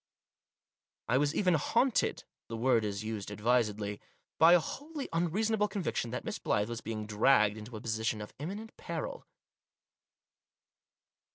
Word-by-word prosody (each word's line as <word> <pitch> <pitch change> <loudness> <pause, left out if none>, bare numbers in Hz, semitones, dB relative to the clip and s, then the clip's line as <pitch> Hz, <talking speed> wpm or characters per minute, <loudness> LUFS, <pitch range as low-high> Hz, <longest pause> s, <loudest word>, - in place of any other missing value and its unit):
I 125 - +3
was 145 +1 +1
even 185 -3 +3
haunted 230 - +2
— - - -63
the 115 - -4
word 120 -1 +3
is 100 0 -3
used 110 -2 -4
advisedly 105 -1 0 0.2
— - - -49
by 165 +2 +8
a 180 - +7
wholly 290 - -6
unreason 180 +7 +1
able 210 -1 +2
conviction 190 - -2
that 125 +2 -4
Miss - - -4
Blyth 105 +2 0
was 120 -1 -4
being 110 -1 -4
dragged 105 0 +4
into 110 +1 -8
a - - -9
position 110 -1 -1
of 105 - -8
imminent 205 +9 -6
peril. - - -5
120 Hz, 155 wpm, -31 LUFS, 110-175 Hz, 0.2 s, by